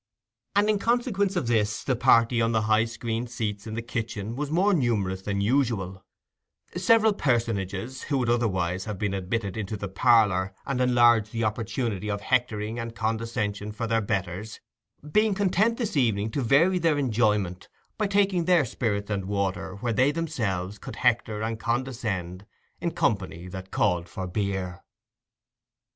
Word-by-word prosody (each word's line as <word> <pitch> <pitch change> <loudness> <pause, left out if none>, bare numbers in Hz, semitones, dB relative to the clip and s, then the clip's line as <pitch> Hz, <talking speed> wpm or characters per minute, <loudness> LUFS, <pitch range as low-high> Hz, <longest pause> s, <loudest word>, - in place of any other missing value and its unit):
And 205 +1 +4
in 215 -1 +2
consequence 225 -4 +1
of 175 - 0
this, 105 -3 0
the 130 - +1
party 115 0 +4
on 115 0 +1
the 110 -1 +2
high 110 +1 +3
screened 115 +1 -4
seats 105 -3 -4
in 110 - -5
the 115 - -3
kitchen 115 -2 -4
was 145 +2 -3
more 185 +6 +3
numerous 105 - 0
than 100 0 -2
usual; 100 -6 0 0.7
several 220 +4 +4
personages, 115 - -1
who 140 - 0
would 125 -2 0
otherwise 95 -6 0
have 105 -3 -4
been 100 0 -1
admitted 95 +1 -2
into 105 0 -4
the 100 - -4
parlour 95 -2 +3
and 130 -2 -1
enlarged 120 -4 +4
the 115 -1 -2
opportunity 110 -1 -2
of 100 0 -2
hectoring 115 -2 0
and 115 0 -5
condescension 110 -2 -2
for 115 +2 -4
their 115 0 +1
betters, 100 +1 -3 0.5
being 215 +1 +3
content 205 +3 +2
this 220 -6 -2
evening 110 -5 +1
to 140 - -1
vary 160 +10 +4
their 165 -3 +2
enjoyment 105 -8 0 0.3
by 210 - +2
taking 195 -3 +2
their 175 -5 +4
spirits 110 -4 -2
and 100 -2 -1
water 95 -1 -2
where 120 -2 0
they 125 +5 +3
could 145 - 0
themselves 105 - -2 0.2
hector 110 -3 +1
and 110 0 -3
condescend 110 -8 -3 0.3
in - - -1
company 85 +2 -1
that 95 0 -8
called 90 -5 0
for 95 - -5
beer. 95 -2 -3
115 Hz, 160 wpm, -26 LUFS, 100-130 Hz, 0.7 s, And